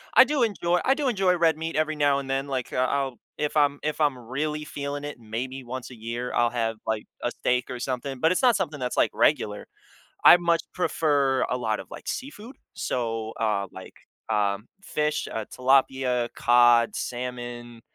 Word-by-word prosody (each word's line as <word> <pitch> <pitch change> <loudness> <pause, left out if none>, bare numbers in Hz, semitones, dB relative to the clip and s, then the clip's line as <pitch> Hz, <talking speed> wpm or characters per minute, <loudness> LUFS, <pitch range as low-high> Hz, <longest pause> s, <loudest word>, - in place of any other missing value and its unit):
I - - +10
do 295 -2 0
enjoy 180 -5 +1
I 270 - +4
do 290 -1 -1
enjoy 190 -6 +2
red 165 -2 +3
meat 160 +1 -4
every 155 0 +1
now 145 -2 +3
and 140 - -7
then, 135 +1 -1
like, 130 -3 -3
uh, - - -2
I'll 135 -4 -1 0.2
if 150 0 -2
I'm 145 -1 +3
if 155 +1 -2
I'm 145 -4 +2
really 150 +6 -3
feeling 145 -1 -5
it, 145 0 -6
maybe 125 +4 -5
once 130 +1 -7
a - - -10
year, 115 +2 -5
I'll 120 0 +3
have, 115 -2 -2
like, 110 -1 -1 0.2
a - - 0
steak 125 0 -1
or 125 - -5
something, 130 +2 -3
but 160 +6 +3
it's 185 - +1
not 245 -4 +5
something 160 -7 -2
that's, 125 -1 -3
like, - - +3
regular. 105 -1 +1 0.6
I - - +10
much 170 -1 +1
prefer 140 -7 +1
a 125 - +1
lot 110 -3 -1
of, - - -12
like, - - -10
seafood, 260 -2 -6 0.2
so, 115 -2 -2
uh, 105 -3 +1
like, 95 - -11 0.3
um, 105 -1 0 0.2
fish, 150 -3 -1
uh, 110 - -3
tilapia, 130 -2 +2
cod, 120 -1 +5
salmon, 120 -1 -5
130 Hz, 190 wpm, -26 LUFS, 120-150 Hz, 0.6 s, I